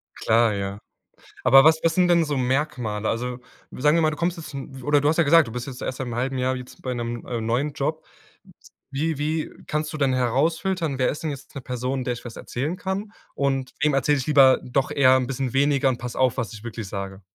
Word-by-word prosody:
Klar, 115 -1 +3
ja. 100 0 -4 0.6
Aber 135 +2 +7
was 160 0 +5
was 165 -1 +2
sind 180 0 +3
denn 170 -1 +4
so 145 -2 -2
Merkmale? 125 -5 -1
Also 125 +2 -2 0.3
sagen 150 +5 +2
wir 165 - +3
mal, 155 - +3
du 155 - -5
kommst 170 +2 -1
jetzt 160 -2 -9
'n 135 -1 -8
oder 145 +2 +3
du 145 - +2
hast 160 - +2
ja 170 - +5
gesagt, 160 -2 +5
du 115 - -8
bist 125 0 -5
jetzt 130 -3 -8
erst 130 - -4
seit 130 - -3
'nem 120 - -5
halben 130 +2 -1
Jahr 130 +1 0
jetzt 125 0 -11
bei 130 - -3
'nem, 120 0 -4
äh, 120 -2 -3
neuen 125 +7 0
Job. 150 +2 -3 0.9
Wie 155 +3 -1
wie 155 +2 -1 0.2
kannst 155 +1 -2
du - - -4
denn 135 -3 +2
herausfiltern, 155 +5 0
wer 130 - +3
ist 150 - -5
denn 160 - -1
jetzt 140 -1 -8
'ne 135 - -5
Person, 125 +1 -3
der 125 - -1
ich 120 - -10
was 115 - -8
erzählen 145 +8 -3
kann? 195 +3 -4 0.2
Und 135 -2 -1
wem 150 -2 +3
erzähle 140 +2 +2
ich 130 - -4
lieber 135 -3 +6
doch 130 +2 -1
eher 130 -2 +5
'n 130 -1 +1
bisschen 135 -2 -3
weniger 140 0 +3
und 125 - -1
passe 120 -1 -6
auf, 130 -2 +2
was 115 - -3
ich 110 -1 -10
wirklich 115 -3 -6
sage. 100 0 -6
135 Hz, 240 wpm, -24 LUFS, 125-150 Hz, 0.9 s, Aber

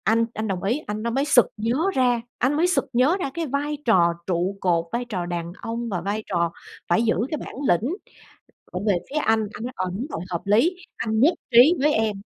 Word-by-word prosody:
Anh 230 +2 +3
anh 220 0 -3
đồng 190 -3 -3
ý. 230 +9 +1
Anh 210 +1 -4
đó 235 - -1
mới 270 +4 +1
sực 265 -5 +6
nhớ 230 +4 0 0.2
ra, 245 -2 +2 0.2
anh 260 +3 +1
mới 340 +3 +3
sực 360 - +1
nhớ 260 +9 +3
ra 275 - -2
cái 335 -1 -2
vai 290 +2 -2
trò 175 -7 +4
trụ 185 +2 -1
cột, 170 -3 +2
vai 240 +1 -2
trò 190 -7 -3
đàn 175 -1 -4
ông 230 +1 -4
và 180 -5 -2
vai 205 +4 -2
trò 170 -3 0 0.4
phải 175 +6 +3
giữ 225 - +2 0.2
cái 310 - -1
bản - - -8
lĩnh 220 - +2 0.8
ở 180 - -3
về 200 - +4
phía 290 - -3
anh. 225 -7 +3
Anh - - -7
nói: 250 +1 -5
"Ờ, 185 - -2
đúng 220 +8 -3
rồi, 165 - -5
hợp 170 -2 -3
lý. 230 - +3 0.2
Anh 220 -1 -1
nhất 300 +9 +5 0.2
trí 245 +8 +8
với 295 +1 +3
em." 215 -3 0
225 Hz, 235 wpm, -24 LUFS, 190-260 Hz, 0.8 s, trí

